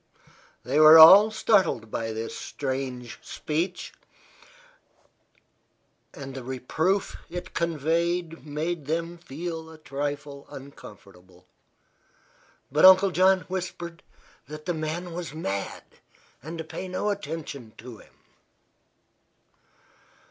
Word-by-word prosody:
They 135 +5 0
were 155 +1 +10
all 190 +7 +10
startled 195 - +1
by 115 0 -3
this 110 +1 -5
strange 130 -3 -5
speech, 170 +4 -4 2.2
and 135 -1 -9
the 130 -1 -7
reproof 155 +10 -1
it 180 +1 -7
conveyed 170 +1 -1
made 155 +1 -4
them 165 +2 -3
a 160 +2 -6
trifle 145 -1 -5
uncomfortable; 95 -9 -14 1.3
but 150 +2 +1
Uncle 190 +1 +8
John 185 +1 +4
whispered 175 -2 -6 0.5
that 150 +1 -9
the 175 - -1
man 165 +2 -4
was 165 -4 -6
mad, 100 -11 -4 0.6
and 160 +5 -8
to 160 - -4
pay 175 +4 -7
no 185 +3 -1
attention 150 - -6
to 115 -1 -11
him. - - -19
155 Hz, 100 wpm, -26 LUFS, 135-175 Hz, 2.2 s, were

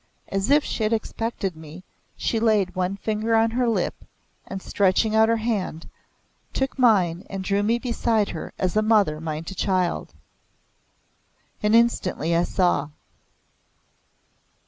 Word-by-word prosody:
As 195 +3 -1
if 290 +1 +5
she - - -4
had 215 +1 +1
expected 225 -4 -3
me, 160 +3 -11 0.3
she 225 - -1
laid 210 -5 +2
one 185 +1 -2
finger 220 +2 -1
on 225 0 +3
her 245 0 +1
lip, 225 - -2 0.4
and 195 - -5
stretching 200 +3 +1
out 220 0 +4
her 230 - +3
hand, 215 -8 -3 0.7
took 265 0 -2
mine 190 -8 +3
and 195 -1 -5
drew 200 +1 +1
me 225 +3 +2
beside 230 -3 0
her 160 - -6
as 185 0 -1
a 215 - +4
mother 205 -8 +2
might 160 +1 -5
a - - -5
child. 185 -2 -1 1.5
And 210 +1 +3
instantly 185 -8 +2
I 170 +1 +2
saw! 175 -6 +1
205 Hz, 145 wpm, -24 LUFS, 180-225 Hz, 1.5 s, if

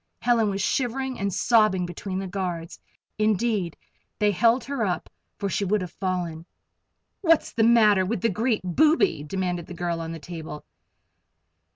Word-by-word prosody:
Helen 235 -3 +3
was 195 0 -2
shivering 265 +2 -1
and 200 0 -1
sobbing 205 -2 +3
between 185 +2 -5
the 195 - -3
guards 180 -3 -4 0.4
indeed 215 -4 +1 0.4
they 210 0 +3
held 230 +5 +3
her 275 -3 -2
up, 180 -5 -2 0.3
for 200 - -2
she 195 - -1
would 200 +1 +1
have 180 -2 -5
fallen. 175 -3 -3 0.7
"What's 330 -4 +3
the 230 - 0
matter 215 -4 +5
with 190 +1 -2
the 230 - +2
great 220 +3 0
booby?" 305 - +3
demanded 180 +1 -3
the 175 - -8
girl 170 -1 -2
on 165 0 -5
the 165 - -5
table. 160 -1 -8
195 Hz, 160 wpm, -25 LUFS, 175-230 Hz, 0.7 s, matter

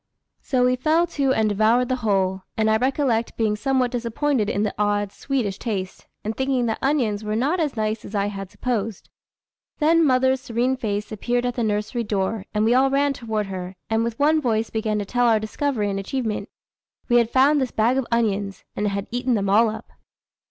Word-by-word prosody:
So 250 -2 +1
we 250 0 +3
fell 315 +6 +3
to 280 -5 0
and 220 -4 +2
devoured 220 +4 +3
the 255 0 0
whole; 195 -5 0 0.2
and 220 0 +2
I 220 - +4
recollect 255 -2 0
being 215 -2 +1
somewhat 255 +1 0
disappointed 240 -1 0
in 205 - 0
the 210 - -1
odd, 205 -1 0
sweetish 235 -9 -2
taste, 195 -6 -4 0.2
and 215 +1 -3
thinking 265 -2 0
that 220 -1 -1
onions 240 -7 0
were 215 0 -2
not 285 +11 +1
as 295 -7 -1
nice 215 0 -1
as 210 - -8
I 200 0 +1
had 195 -2 -5
supposed. 225 -5 -3 0.7
Then 330 +2 +4
mother's 260 -2 +3
serene 245 +2 0
face 210 -4 -3
appeared 240 +3 -1
at 245 - 0
the 240 - -3
nursery 210 +3 -1
door, 205 0 -2
and 210 0 +1
we 230 - +4
all 265 +2 +4
ran 280 +1 +2
toward 220 -4 -3
her, 185 -1 -6 0.2
and 225 0 +2
with 230 -1 -3
one 310 +2 +3
voice 225 -4 0
began 220 -1 -1
to 205 - -2
tell 245 +4 +1
our 225 -2 +4
discovery 220 -1 -1
and 195 - -2
achievement. 220 +1 -3 0.6
We 240 - +4
had 235 -1 +3
found 275 +4 +4
this 260 - 0
bag 235 +5 +2
of 265 - -3
onions, 205 -4 0
and 210 - -1
had 200 0 -2
eaten 245 +1 0
them 200 -2 0
all 220 +2 +5
up. 215 - -8
230 Hz, 205 wpm, -23 LUFS, 210-260 Hz, 0.7 s, all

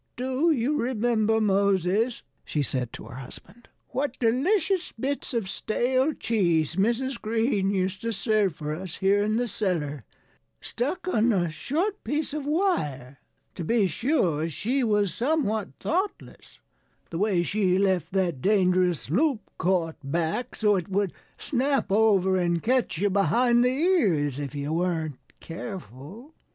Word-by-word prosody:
"Do 260 +6 0
you 290 0 +1
remember, 225 -2 +1
Moses," 200 +2 +1 0.2
she 150 - -1
said 125 -3 -2
to - - -8
her 120 +3 -10
husband, 205 - -11 0.2
"what 265 0 -2
delicious 340 - +1
bits 275 +3 -2
of 230 -6 -1
stale 255 +8 0
cheese 170 - +1
Mrs. 235 +6 0
Green 220 -2 +1
used 190 -1 -1
to 230 - -2
serve 210 -4 +1
for 150 0 -4
us 180 +2 -6
here 200 +1 +2
in 215 +1 +1
the 245 0 0
cellar, 165 - -2 0.6
stuck 320 +10 -3
on 235 -9 +3
a 175 -6 +1
short 345 - -2
piece 295 0 -2
of 295 -2 -4
wire? 150 - -1 0.3
To 175 - -5
be 220 +4 +2
sure, 180 - 0
she 250 - -1
was 210 -5 +1
somewhat 235 -7 0
thoughtless 375 +5 -3 0.5
the 165 - -3
way 195 -4 +2
she 185 +1 +1
left 190 -3 +1
that 180 -8 0
dangerous 185 -6 +2
loop 260 - +2 0.2
caught 170 -2 0
back, 165 - -2
so 210 -2 +3
it 180 +1 -4
would 195 -1 0 0.2
snap 270 -4 0
over 195 -3 +3
and 175 -2 0
catch 250 -8 +1
you 200 +3 +1
behind 240 +5 +3
the 250 - +4
ears 215 - +1
if 145 0 -5
you 145 +2 -3
weren't 165 -4 -1 0.2
careful. 185 - -9
205 Hz, 145 wpm, -26 LUFS, 175-250 Hz, 0.6 s, the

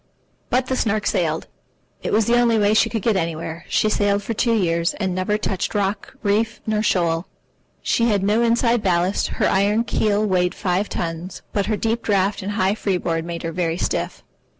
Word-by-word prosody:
But 255 +1 +2
the 260 - -1
Snark 215 -3 0
sailed. - - 0 0.6
It - - -3
was 220 0 +3
the 235 - +3
only 235 -2 +3
way 205 0 +3
she 225 +1 +4
could 225 -3 -3
get 225 -3 +2
anywhere. 165 -1 -3
She - - +2
sailed 205 -1 +1
for 230 - -3
two 230 +1 +1
years, 170 -4 +1
and 190 -3 -2
never 185 +3 0
touched 195 -1 -2
rock, 200 0 -2
reef, 215 +3 +1
nor 215 -1 0
shoal. 170 -4 +1 0.6
She 230 - +2
had 200 -3 +1
no 210 +3 +2
inside 235 0 +2
ballast, 185 0 +1
her - - +2
iron 205 +4 +2
keel 215 -2 +1
weighed 180 -3 +1
five 190 +1 -1
tons, 170 +2 -5
but 200 -1 0
her 215 -1 0
deep 225 +3 -1
draught 200 -1 +1
and 200 +2 -3
high 195 -1 +2
freeboard 180 -6 -1
made 170 0 -5
her 165 - -2
very 165 -1 -1
stiff. - - -2
200 Hz, 195 wpm, -21 LUFS, 180-220 Hz, 0.6 s, she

